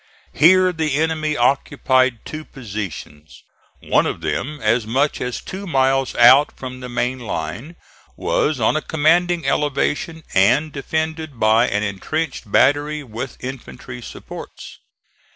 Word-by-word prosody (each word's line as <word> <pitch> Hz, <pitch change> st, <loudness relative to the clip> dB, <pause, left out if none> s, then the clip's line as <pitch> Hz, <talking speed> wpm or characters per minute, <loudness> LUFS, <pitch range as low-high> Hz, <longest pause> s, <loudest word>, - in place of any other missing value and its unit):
Here 185 Hz, +4 st, +5 dB
the 155 Hz, -4 st, -1 dB
enemy 155 Hz, 0 st, 0 dB
occupied 130 Hz, -1 st, +1 dB
two 155 Hz, 0 st, -6 dB
positions. 100 Hz, -, -8 dB, 0.4 s
One -, -, +2 dB
of -, -, -4 dB
them, 150 Hz, +4 st, -3 dB
as 110 Hz, -1 st, +1 dB
much 135 Hz, +6 st, 0 dB
as 125 Hz, -1 st, -3 dB
two 195 Hz, +1 st, -7 dB
miles 135 Hz, -3 st, +1 dB
out 130 Hz, +5 st, +6 dB
from 130 Hz, -1 st, -7 dB
his 125 Hz, -, -7 dB
main 125 Hz, +1 st, -1 dB
line, 110 Hz, -, -5 dB, 0.4 s
was 150 Hz, -3 st, 0 dB
on 110 Hz, -, +2 dB
a 155 Hz, -, 0 dB
commanding 165 Hz, +2 st, +2 dB
elevation 150 Hz, +3 st, -1 dB
and 125 Hz, +11 st, +3 dB
defended 155 Hz, -1 st, -3 dB
by 110 Hz, +3 st, +4 dB
an 105 Hz, +1 st, -1 dB
intrenched 105 Hz, -, -3 dB
battery 145 Hz, +4 st, +2 dB
with 120 Hz, +1 st, -7 dB
infantry 125 Hz, -1 st, -8 dB
supports. -, -, -10 dB
135 Hz, 130 wpm, -20 LUFS, 120-155 Hz, 0.4 s, out